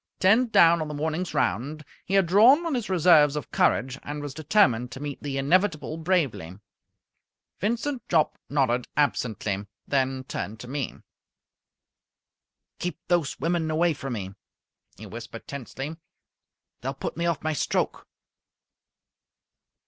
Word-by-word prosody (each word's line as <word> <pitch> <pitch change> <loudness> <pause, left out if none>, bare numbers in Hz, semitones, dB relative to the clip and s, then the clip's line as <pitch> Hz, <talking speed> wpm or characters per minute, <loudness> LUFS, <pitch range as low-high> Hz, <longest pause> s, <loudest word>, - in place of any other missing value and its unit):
Ten 220 +7 +4
down 170 -6 +5
on 155 - -2
the 150 - -5
morning's 160 +4 -2
round, 150 +5 -1 0.2
he 195 - 0
had 195 -2 +5
drawn 230 - +6
on 330 - -1
his 240 -6 -2
reserves 160 -5 +5
of 150 -6 -5
courage 130 +1 +1
and 145 +1 -6
was 145 -2 -6
determined 140 - +2
to 130 - -8
meet 145 -1 -6
the 140 -2 -3
inevitable 155 0 +1
bravely. 155 - -1 1.0
Vincent 240 +5 -2
Jopp 160 -3 +2
nodded 130 -4 +1
absently, 110 -7 0 0.2
then 130 -1 0
turned 110 -4 -5
to 125 - -9
me. 135 0 -3 1.8
"Keep 180 - -3
those 170 -6 +1
women 165 +1 0
away 165 +2 +2
from 135 -3 -5
me," 95 -3 -5 0.6
he - - -10
whispered - - -9
tensely. 140 +2 -6 0.9
"They'll 135 +2 -3
put - - -5
me 170 +1 -1
off 165 -4 -1
my 155 0 0
stroke!" 145 - -1
150 Hz, 135 wpm, -26 LUFS, 135-175 Hz, 1.8 s, drawn